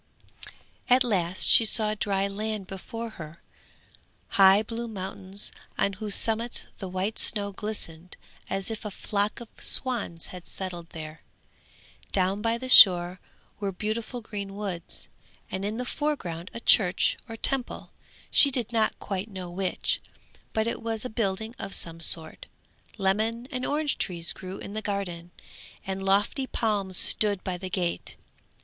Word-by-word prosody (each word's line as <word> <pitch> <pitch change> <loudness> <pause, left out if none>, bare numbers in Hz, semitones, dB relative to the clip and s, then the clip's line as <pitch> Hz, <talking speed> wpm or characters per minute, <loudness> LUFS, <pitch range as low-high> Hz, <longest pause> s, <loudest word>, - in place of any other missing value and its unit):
At 255 +1 +6
last 185 -6 0
she - - +8
saw 215 -1 +4
dry 200 -2 0
land 210 0 -4
before 225 +5 -6
her, 155 +2 -9 0.9
high 195 -1 +6
blue 230 +2 -5
mountains 195 -1 -5 0.3
on 200 - +1
whose 205 +1 +1
summits 230 +1 +1
the 190 - -5
white 190 +4 -2
snow 200 -2 +3
glistened 180 -5 -6 0.3
as 195 +3 -2
if 220 - -5
a 210 - -3
flock 205 +1 -1
of 235 - -9
swans 225 -10 0
had 180 -1 -9
settled 175 -3 -5
there; 155 -1 -8 0.9
down 190 +1 +1
by 230 +1 +1
the 260 +2 -6
shore 180 -6 +8 0.4
were 200 -1 -1
beautiful 220 +5 -3
green 200 -2 -6
woods, 195 -5 -5 0.4
and 190 - -3
in 210 +2 -2
the 250 - -3
foreground 195 - -3
a - - -6
church 195 -5 +4
or 225 - -5
temple, 265 +2 0 0.4
she 285 - +6
did 245 -3 -3
not 220 -1 +2
quite 195 +2 -4
know 185 -3 -7
which, 185 +1 -1 0.5
but 220 0 0
it 230 - -3
was 225 0 -3
a 250 - -4
building 220 0 -2
of 195 - -4
some 165 0 -1
sort. 160 -1 +1 0.5
Lemon 220 +5 0
and 255 -2 -2
orange 295 0 0
trees 170 -5 0
grew 185 0 -8
in 200 - -8
the 215 - -3
garden, 185 -5 -4 0.6
and 195 0 -3
lofty 205 +7 +2
palms 200 -7 +1
stood 205 -3 +3
by 185 - -2
the 185 +1 -6
gate. 175 -2 -2
200 Hz, 150 wpm, -27 LUFS, 185-225 Hz, 0.9 s, she